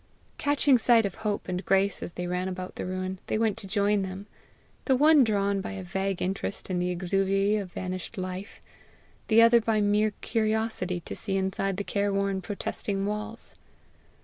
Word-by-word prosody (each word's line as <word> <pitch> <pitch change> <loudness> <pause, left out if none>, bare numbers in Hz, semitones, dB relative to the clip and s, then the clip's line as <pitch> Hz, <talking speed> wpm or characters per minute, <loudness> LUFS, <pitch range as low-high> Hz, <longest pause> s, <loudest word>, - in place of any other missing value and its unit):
Catching 285 -2 +3
sight 230 -1 +5
of 195 - -2
Hope 210 -2 -2
and 180 0 -3
Grace 195 +2 +2
as 170 - -5
they 180 - -4
ran 180 +1 -2
about 185 0 -5
the - - -5
ruin, 185 0 -3
they - - 0
went 220 -2 +1
to 195 - -7
join 205 +1 +2
them, 190 +1 -5 0.6
the 265 - +4
one 300 +1 +6
drawn 200 -3 +1
by 190 - -5
a 195 -1 -6
vague 190 +1 -2
interest 195 +1 -3
in 180 - 0
the 180 0 0
exuviae 195 +3 +1
of 185 -3 -9
vanished 185 +4 -5
life, 185 +2 -6 0.6
the 225 +1 +6
other 230 0 +6
by 220 -1 +1
mere 210 +1 +3
curiosity 220 -5 -1
to - - -7
see 195 -2 -1
inside 190 0 -1
the 200 - -2
care 200 0 0
worn, 195 -1 0
protesting 200 0 -3
walls. 210 +2 -4
195 Hz, 180 wpm, -27 LUFS, 185-215 Hz, 0.6 s, one